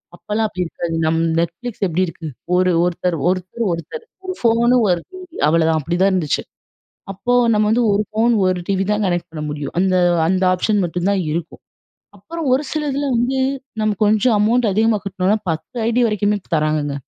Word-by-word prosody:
அப்பலாம் 215 +4 -2
அப்டி 185 - -5
இருக்காது. 165 0 -5
நம் 160 +1 +1 0.2
நெட்ஃபிளிக்ஸ் 200 +7 -4
எப்டி 175 +1 -1
இருக்கு. 165 -1 -8 0.3
"ஒரு 185 0 +3
ஒருத்தர் 180 0 -1
ஒருத்தர் 185 +5 -2
ஒருத்தர் 310 - -6 0.2
ஒரு 370 - -3
ஃபோனு 235 +1 +3
ஒரு 175 -1 +1
டிவி 370 -2 -11
அவ்வளதான்" 160 0 +3
அப்டிதான் 175 +6 +1
இருந்துச்சு. 170 -6 0 0.7
அப்போ 240 +6 -2 0.2
நம்ம 210 0 +2
வந்து 235 +3 +2
ஒரு 205 +1 +1
ஃபோன், 225 +2 +2
ஒரு 185 -1 +1
டிவி 195 -1 0
தான் 210 0 0
கனெக்ட் 175 -1 -2
பண்ண 155 -2 -6
முடியும். 145 -1 -5
அந்த 185 0 +2 0.3
அந்த 185 +2 +1
ஆப்ஷன் 205 +3 +1
மட்டும் 175 +2 -1
தான் 195 -2 +1
இருக்கும் 165 +1 -5 0.6
அப்புறம் 325 - -5
ஒரு 275 +3 0
சில 310 - -1
இதில 285 +1 -1
வந்து 250 +3 0 0.4
நம்ம 215 -1 0
கொஞ்சம் 215 +2 +3
அமௌண்ட் 225 +1 +2
அதிகமா 220 +2 +2
கட்னோம்னா 195 +2 0
10 160 +8 -5
ஐடி 235 +1 +1
வரைக்குமே 210 -1 0 0.2
தர்றாங்கங்க. 150 -2 0
195 Hz, 170 wpm, -19 LUFS, 170-225 Hz, 0.7 s, ஒரு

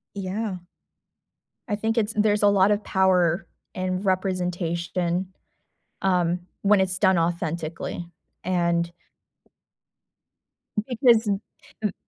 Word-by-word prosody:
Yeah. 195 0 -3 1.1
I 205 - 0
think 225 +2 -1
it's 220 -1 +1
there's 210 0 +2
a 205 - +6
lot 200 0 +4
of 210 0 +1
power 180 -2 +2 0.3
and 185 +1 -2
representation, 180 -1 -1 0.7
um, 180 -2 +2 0.2
when 200 0 +4
it's 185 -1 +1
done 190 -3 +4
authentically, 170 0 -2 0.4
and 170 -1 +1 2.0
because 235 -3 +4
n 200 0 0 0.4
m 210 -3 0
185 Hz, 100 wpm, -25 LUFS, 175-205 Hz, 2.0 s, a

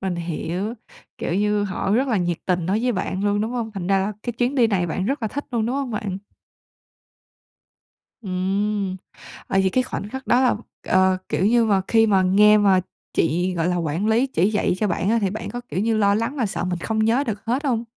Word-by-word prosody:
Mình 190 -2 -2
hiểu, 170 +5 -3 0.4
kiểu 170 - -2
như, 210 +1 +1
họ 195 0 -2
rất 255 +6 +2
là 230 - +1
nhiệt 175 -3 -1
tình 180 -2 0
đối 200 +4 +1
với 250 0 +1
bạn 190 -1 -2
luôn, 205 0 +1
đúng 220 - -1
hông? 235 -3 -3
Thành 190 -4 -5
ra 195 +1 +3
là 195 +2 -1
cái 240 - -3
chuyến 245 +3 -1
đi 245 -4 +4
này 190 -5 0
bạn 185 +3 -2
rất 275 0 -2
là 220 - 0
thích 285 +5 -5
luôn, 230 -3 0
đúng 245 - -1
hông 275 -3 -2
bạn? 200 -3 -3 2.0
Ừm. 195 +1 -1 0.5
Ờ, 195 - 0
vậy 190 0 +2
cái 255 - +3
khoảnh 205 -4 -5
khắc 265 +4 -7
đó 245 +2 +4
là, 255 - +3 0.3
ờ, 185 0 +3
kiểu 190 - +1
như 235 +1 +4
mà, 200 -3 +3
khi 225 -1 +4
mà 195 -3 +3
nghe 210 +3 +5
mà 195 -3 +4 0.3
chị 175 +4 +1
gọi 170 0 0
là 180 - 0
quản 170 +4 -1
lý 230 +4 +3
chỉ 205 -7 +1
dạy 210 -4 +1
cho 215 - +1
bạn 185 +2 0
á, 230 - +3
thì 195 -3 0
bạn 215 +3 -5
có, 245 - -5
kiểu, 185 - -2
như 220 +1 +1
lo 200 -1 +3
lắng 230 +6 -1
mà 245 -6 0
sợ 195 - -3
mình 180 -1 -2
không 220 +5 -2
nhớ 230 +6 +2
được 210 -3 -4
hết 250 +6 -1
hông? 240 -4 0
205 Hz, 235 wpm, -22 LUFS, 185-230 Hz, 2.0 s, nghe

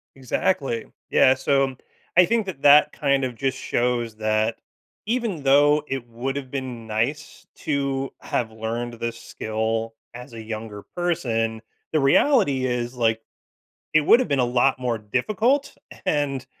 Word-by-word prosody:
Exactly. 130 -2 -1 0.2
Yeah, 130 - +5
so 135 0 +1 0.4
I 180 - +8
think 225 +3 +1
that 180 -8 -7
that 145 +1 +6
kind 140 -2 +1
of 125 -2 -3
just 135 +2 -1
shows 120 -2 -1
that 110 +1 +1 0.5
even 220 - -2
though 145 +2 +4
it 135 -3 -4
would 120 +4 -4
have 140 -2 -5
been 125 -4 -5
nice 115 +7 -3
to 140 -2 -2
have 115 -2 -2
learned 115 +2 -4
this 115 0 -4
skill 110 +1 -3 0.2
as 125 +1 -10
a 115 - -7
younger 110 -2 -7
person, 115 -11 -1 0.3
the 155 - +2
reality 140 - +3
is, 120 0 -2
like, 115 -2 +1 0.7
it 155 - +6
would've 235 - +5
been 140 - 0
a 125 - +3
lot 125 +2 +2
more 125 -2 -1
difficult, 215 - 0 0.3
and 140 -3 0
130 Hz, 145 wpm, -23 LUFS, 115-145 Hz, 0.7 s, I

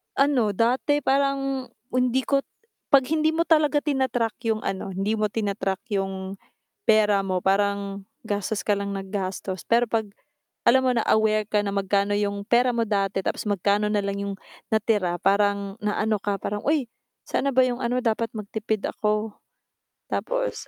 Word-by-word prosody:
Ano, 265 -7 +2
dati 255 +7 +2
parang 275 -1 +1 0.2
hindi 255 +1 +1
ko 275 +2 +1 0.6
'pag 275 - +8
hindi 315 0 +2
mo 330 - +1
talaga 305 -2 +4
tina-track 260 -6 0
'yung 220 -1 0
ano, 190 0 -4
hindi 200 +4 -1
mo 215 - +1
tina-track 200 -2 -2 0.2
'yung 195 0 -4 0.5
pera 210 -2 +5
mo, 185 -2 -2
parang 200 0 +1 0.2
gastos 205 0 -2
ka 210 - +2
lang 200 0 -2
nang 195 - -5
gastos. 190 -1 -4
Pero 235 +1 +4
'pag 225 -2 -1 0.6
alam 260 +2 +6
mo 255 - +3
na 235 -3 0
aware 215 -1 +3
ka 210 -1 +1
na 200 - -2
magkano 200 0 +1
'yung 205 0 -1
pera 245 +3 +3
mo 230 - +2
dati 195 -3 0
tapos - - -3
magkano 205 +1 +1
na 210 -1 0
lang 200 0 -2
'yung 200 - -4 0.3
natira, 210 -5 +1
parang 200 0 +1
naano 210 0 0
ka, 205 0 -1
parang, 205 +1 -3
"Uy, 285 -6 +1 0.3
saan 280 - -1
na 275 - -1
ba 260 - +6
'yung 250 -1 -1
ano, 250 0 -1
dapat 230 -1 +1
magtipid 215 0 -3
ako," 215 0 -1 0.8
Tapos - - -2
215 Hz, 165 wpm, -25 LUFS, 200-250 Hz, 0.8 s, pag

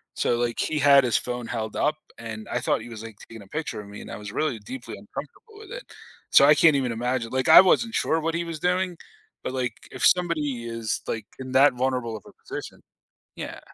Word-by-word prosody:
so 120 - +1
like 120 -1 -1
he 155 -1 0
had 140 -2 +7
his 120 - +2
phone 125 -1 -4
held 110 -2 -4
up 150 - +1 0.2
and 110 -2 -7
I 120 - 0
thought 125 - 0
he 120 - -10
was 110 -1 -8
like 115 -2 -9
taking 115 -3 -10
a - - -18
picture 150 -3 -4
of 100 - -13
me 100 - -9
and - - -10
I - - -6
was 105 -1 -8
really 155 -2 -1
deeply 115 +1 -8
uncomfortable 150 - -10
with 435 0 -12
it. - - -7 0.5
So, 140 - +8
I 150 - +7
can't 155 -2 +5
even 125 -4 -1
imagine 120 0 -2
like 130 +2 0
I 160 - +11
wasn't 225 +5 +2
sure 165 - +1
what 165 +1 -1
he 170 0 -1
was 165 -1 -5
doing, 180 +1 0 0.5
but - - -3
like 125 -3 -1 0.2
if - - -1
somebody 155 -8 +2
is 115 -1 -3
like 110 -2 -3
in 130 -1 -7
that 135 0 +6
vulnerable 125 -3 -1
of 100 - -15
a - - -14 0.2
position - - -7 0.6
yeah. - - -6
125 Hz, 230 wpm, -25 LUFS, 115-155 Hz, 0.6 s, I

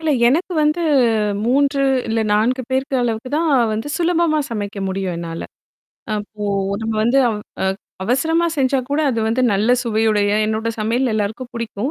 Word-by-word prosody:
இல்ல. 320 -1 0 0.2
எனக்கு 335 +8 0
வந்து 305 +3 +1 0.6
3 275 +2 +2 0.3
இல்ல 225 - +1
4 240 +5 +1
பேருக்கு 265 +1 0
அளவுக்கு 230 +1 -2
தான் 330 0 +1 0.2
வந்து 225 +6 -3
சுலபமா 335 -2 +2
சமைக்க 205 -3 -4
முடியும் 190 -2 -2
என்னால. 165 -1 -5 0.7
அப்போ 210 0 -5 0.4
நம்ம 225 0 -2
வந்து, 255 +4 +3 0.4
அ - - +1 0.4
அவசரமா 320 - +1
செஞ்சா 270 0 +2
கூட 285 +2 0
அது 230 - -2
வந்து 235 +3 +1
நல்ல 210 +4 +2
சுவையுடைய 215 -3 +1 0.2
என்னோட 220 +1 -1
சமையல் 235 +4 0
எல்லாருக்கும் 220 +4 -3
புடிக்கும், 230 +3 -3
235 Hz, 145 wpm, -19 LUFS, 215-275 Hz, 0.7 s, வந்து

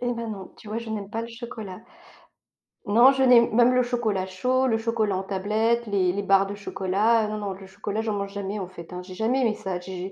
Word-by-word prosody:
Eh 245 0 -1
ben 230 -1 -4
non, 195 -3 -8
tu 215 - -13
vois, 215 - -3
je 230 -1 -7
n'aime 205 -2 -4
pas 225 0 -3
le 230 - -6
chocolat. 230 -5 -8 1.1
Non, 235 +6 +6
je 265 - 0
n'ai 250 -2 +8
même 240 +2 +5
le 250 - +4
chocolat 225 -6 -1
chaud, 255 +8 +1
le 225 -3 +2
chocolat 225 -3 0
en 190 - -2
tablette, 215 +5 0
les 190 -4 +1
les 200 - -2
barres 195 0 +4
de 200 - -5
chocolat, 205 +3 +1
non, 215 0 -3
non, 205 -2 -3
le 190 0 -10
chocolat, 205 +2 -4
j'en 220 -1 -1
mange 200 -1 -3
jamais, 200 +1 -4
en 190 - -4
fait, 175 -2 -11
hein, 180 - -5
j'ai 185 0 -10
jamais 235 +7 +1
aimé 225 -3 +2
ça, 190 -4 -4
j'ai 185 +1 -6
210 Hz, 245 wpm, -25 LUFS, 195-230 Hz, 1.1 s, n'ai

